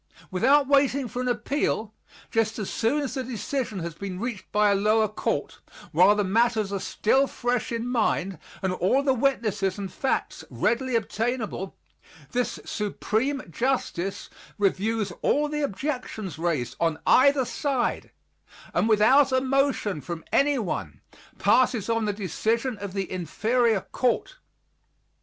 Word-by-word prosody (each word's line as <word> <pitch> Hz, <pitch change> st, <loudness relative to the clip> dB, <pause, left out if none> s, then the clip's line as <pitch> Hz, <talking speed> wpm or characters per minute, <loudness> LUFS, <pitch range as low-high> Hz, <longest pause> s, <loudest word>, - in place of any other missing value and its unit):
Without 270 Hz, +10 st, +4 dB
waiting 275 Hz, -1 st, +3 dB
for 245 Hz, +2 st, -4 dB
an 255 Hz, -, -2 dB
appeal, 245 Hz, -4 st, -1 dB, 0.4 s
just 225 Hz, -1 st, +1 dB
as 210 Hz, -4 st, -4 dB
soon 275 Hz, +7 st, +1 dB
as 275 Hz, -, -4 dB
a 260 Hz, -, -2 dB
decision 245 Hz, -1 st, -3 dB
has 170 Hz, 0 st, -4 dB
been 185 Hz, +2 st, -6 dB
reached 230 Hz, -4 st, -5 dB
by 210 Hz, 0 st, +4 dB
a -, -, +3 dB
lower 215 Hz, +2 st, +3 dB
Court, 210 Hz, -, -3 dB, 0.3 s
while 185 Hz, +6 st, +6 dB
the 205 Hz, -, +1 dB
matters 215 Hz, 0 st, +1 dB
are 200 Hz, -, -1 dB
still 265 Hz, +8 st, +2 dB
fresh 245 Hz, -2 st, -2 dB
in 230 Hz, +1 st, -2 dB
mind 195 Hz, -, 0 dB, 0.2 s
and 190 Hz, -1 st, +1 dB
all 220 Hz, +10 st, +2 dB
the 270 Hz, -2 st, +3 dB
witnesses 215 Hz, -7 st, 0 dB
and 195 Hz, -2 st, -6 dB
facts 265 Hz, -, -2 dB
readily 255 Hz, +1 st, 0 dB
obtainable, 225 Hz, -3 st, -2 dB, 0.6 s
this 250 Hz, 0 st, -1 dB
Supreme 220 Hz, +6 st, -1 dB
Justice 195 Hz, -, -2 dB, 0.3 s
reviews 205 Hz, +2 st, 0 dB
all 295 Hz, +1 st, +2 dB
the 300 Hz, 0 st, -3 dB
objections 235 Hz, -, -4 dB
raised 150 Hz, -8 st, -1 dB
on 165 Hz, -2 st, +1 dB
either 275 Hz, 0 st, +5 dB
side 260 Hz, -2 st, -1 dB, 0.6 s
and 225 Hz, -, +2 dB
without 255 Hz, +7 st, +5 dB
a 260 Hz, -, +3 dB
motion 265 Hz, -, 0 dB
from 170 Hz, 0 st, -6 dB
anyone 195 Hz, -, 0 dB, 0.4 s
passes 230 Hz, 0 st, +3 dB
on 225 Hz, -1 st, +1 dB
the 210 Hz, -, +1 dB
decision 220 Hz, -, -1 dB
of 200 Hz, -2 st, -6 dB
the 195 Hz, -2 st, -3 dB
inferior 215 Hz, -, +1 dB
court. 255 Hz, -, -1 dB
225 Hz, 140 wpm, -26 LUFS, 195-260 Hz, 0.6 s, while